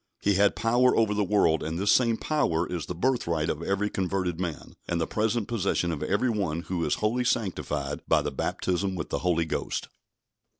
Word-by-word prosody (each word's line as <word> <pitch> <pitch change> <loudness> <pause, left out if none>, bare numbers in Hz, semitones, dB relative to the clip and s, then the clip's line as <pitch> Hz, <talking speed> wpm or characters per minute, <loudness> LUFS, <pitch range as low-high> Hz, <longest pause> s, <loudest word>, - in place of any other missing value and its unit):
He 100 - +2
had 100 +1 +3
power 120 +3 +3
over 110 -2 +3
the 105 0 +1
world, 90 -6 +2
and 80 +1 -3
this 100 +3 +2
same 115 -3 +3
power 90 - 0
is 85 -5 -4
the 90 - -4
birthright 85 -8 0
of 80 - -5
every 100 +4 0
converted 95 -3 -2
man, 85 -4 -5
and 85 - -1
the 80 - +1
present 110 +2 -1
possession 95 -6 0
of 75 - -4
every 105 +6 +1
one 90 -7 -1
who 90 -1 -3
is - - +1
wholly 115 +4 0
sanctified 75 - -1
by - - +3
the - - -2
baptism 95 +1 -1
with 85 - -4
the - - -1
Holy 85 -2 +1
Ghost. 80 - -3
95 Hz, 200 wpm, -27 LUFS, 85-105 Hz, -, had